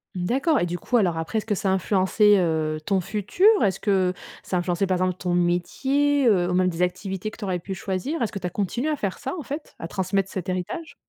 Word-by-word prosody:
D'accord. 265 - +1
Et - - +1
du 175 0 -3
coup, 245 +7 0
alors 180 -7 +2
après, 165 +7 -2
est-ce 215 - -2
que 210 -2 0
ça 195 - -1
a - - +3
influencé, 195 +2 +3
heu, 160 -3 0
ton 195 -2 +2
futur? 210 - -1 0.2
Est-ce 195 -2 +1
que 190 -3 +2 0.3
ça 185 - -2
a - - +2
influencé 175 +2 0
par 185 -1 +1
exemple 185 0 0
ton 180 -1 -2
métier, 265 +11 +1
heu, 180 -5 +3
ou - - 0
même 185 0 +3
des 175 -1 -2
activités 190 +3 -2
que - - -13
tu 215 - -5
aurais 185 -2 -1
pu 190 +3 -6
choisir? 190 - -3
Est-ce 230 - -1
que 200 - -4
tu 180 - -6
as - - -3
continué 215 - -2
à 300 - 0
faire 195 -2 -3
ça 270 -1 -4
en - - -5
fait, 290 +3 -6
à 165 - -5
transmettre 195 +2 -1
cet 185 -1 -5
héritage? 185 - -4
190 Hz, 255 wpm, -24 LUFS, 180-215 Hz, 0.3 s, a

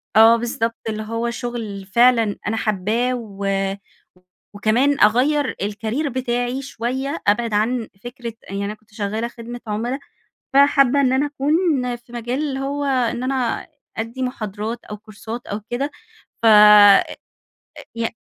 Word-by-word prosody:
آه 225 +1 +8
بالضبط، 230 -1 -2
اللي 215 0 -3
هو 230 +2 -2
شغل 230 -5 -5
فعلًا 230 +1 +3
أنا 225 +2 -1
حابَّاه 220 +4 0
و 200 -5 -7 1.1
وكمان 240 +8 +2
أغيَّر 260 +6 +3
الcareer 220 +8 -2
بتاعي 245 0 -2
شوية 265 +3 -4
أبعد 225 +2 +2
عن 225 +2 0 0.2
فكرة 240 -1 -7 0.2
يعني 200 +1 -3
أنا 205 - -3
كنت 215 0 -22
شغالة 215 +2 -2
خدمة 240 0 -9
عُملا، 235 +6 -2 0.5
فحابَّة 280 -1 +5
إن 260 -2 +2
أنا 270 +2 +2
أكون 290 -3 0
في 240 0 -17
مجال 240 +2 -3
اللي 275 -3 -2
هو 280 +1 -2
إن 250 -3 0
أنا 255 -3 -1 0.3
أدّي 230 +4 -4
محاضرات 225 -2 -4
أو 210 - -7
كورسات 220 +2 -9
أو 205 +1 -4
كده 275 +5 -2 0.5
فأ 230 - +5 0.5
أ - - -8 0.8
ي 230 0 -1
235 Hz, 140 wpm, -21 LUFS, 220-260 Hz, 1.1 s, آه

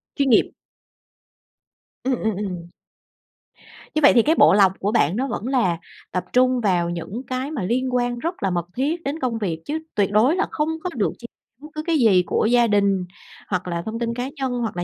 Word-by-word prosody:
Chuyên 275 -1 +1
nghiệp. 230 - +4 1.5
Ừm, 255 -1 0
ừm, 220 -3 -1
ừm. 180 -4 -5 1.3
Như 310 - 0
vậy 285 - +8
thì 235 - +6
cái 320 +2 +3
bộ - - +6
lọc 195 -2 +5
của 205 +2 -1
bạn 180 -7 +2
nó 265 +4 -1
vẫn 235 -1 -4
là 230 -11 +1 0.3
tập 180 0 -2
trung 255 0 +3
vào 180 -5 +1
những 175 +7 -5
cái 260 +3 -3
mà 255 -12 -3
liên 250 +5 -1
quan 245 -1 0
rất 335 - -4
là 195 - +2
mật 175 -2 -1
thiết 310 +7 -1
đến 285 +4 -3
công 245 -5 -1
việc, 175 -7 -3
chứ 310 +2 -2 0.2
tuyệt 200 -1 +1
đối 235 - +4
là - - 0
không 300 0 -1
có 360 - -2
được 210 - 0
chia 240 - -12 0.4
bất 300 - -9
cứ 305 - -3
cái 330 -2 +2
gì 205 -9 +4
của 205 - 0
gia 240 -1 +4
đình, 200 -3 +2 0.4
hoặc 185 -2 -2
là 170 -1 -2
thông 225 +1 -4
tin 235 0 -2
cá 250 +2 -3
nhân, 265 -2 -2
hoặc 220 -6 -3
là 175 - -1
235 Hz, 220 wpm, -22 LUFS, 190-260 Hz, 1.5 s, vậy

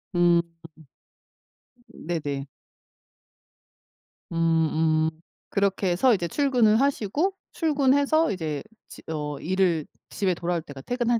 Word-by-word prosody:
음. 175 -1 +5 1.5
네네. 145 -5 -4 1.9
음. 160 -1 +2
음. - - +1 0.4
그렇게 200 -1 +1
해서 240 +8 +4
이제 175 -3 -2
출근을 245 - +3
하시고 280 - 0 0.2
출근해서 290 0 +2
이제 155 -6 -3 0.2
집 - - -13
어 150 -2 -3
일을 180 -3 +1 0.3
집에 190 -3 0
돌아올 170 0 -2
때가 145 -3 -10
퇴근할 240 - 0
180 Hz, 205 characters per minute, -25 LUFS, 160-245 Hz, 1.9 s, 음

